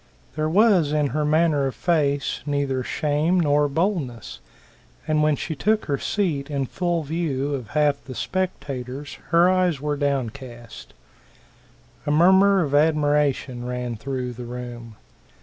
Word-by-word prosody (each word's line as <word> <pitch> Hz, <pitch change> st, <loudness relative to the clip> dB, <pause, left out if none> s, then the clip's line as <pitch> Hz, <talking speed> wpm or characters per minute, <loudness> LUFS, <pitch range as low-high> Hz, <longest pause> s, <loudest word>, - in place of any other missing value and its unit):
There 155 Hz, 0 st, 0 dB
was 185 Hz, -5 st, +4 dB
in 150 Hz, -2 st, +1 dB
her 150 Hz, +2 st, -1 dB
manner 150 Hz, -2 st, +2 dB
or -, -, -2 dB
face 145 Hz, -3 st, 0 dB
neither 140 Hz, -2 st, 0 dB
shame 155 Hz, +6 st, 0 dB
nor 145 Hz, -2 st, +3 dB
boldness, 145 Hz, -, -2 dB, 0.7 s
and 155 Hz, -1 st, +2 dB
when 150 Hz, -1 st, +3 dB
she 160 Hz, -, -4 dB
took 215 Hz, +9 st, +1 dB
her 140 Hz, -2 st, -1 dB
seat 155 Hz, -9 st, -1 dB
in 140 Hz, -2 st, -1 dB
full 175 Hz, +3 st, -1 dB
view 145 Hz, -3 st, -2 dB
of 130 Hz, -5 st, -4 dB
half 145 Hz, -2 st, +2 dB
the 130 Hz, -, -8 dB
spectators, 135 Hz, -, -4 dB
her 170 Hz, +1 st, +5 dB
eyes 180 Hz, -5 st, +2 dB
were 150 Hz, +1 st, -2 dB
downcast. 130 Hz, -4 st, -4 dB, 1.1 s
A -, -, +1 dB
murmur 190 Hz, +5 st, +5 dB
of 145 Hz, -2 st, -4 dB
admiration 145 Hz, -4 st, +1 dB
ran 125 Hz, -1 st, -4 dB
through 125 Hz, +1 st, -4 dB
the 120 Hz, +1 st, -8 dB
room. 120 Hz, -2 st, -8 dB
145 Hz, 140 wpm, -23 LUFS, 130-165 Hz, 1.1 s, her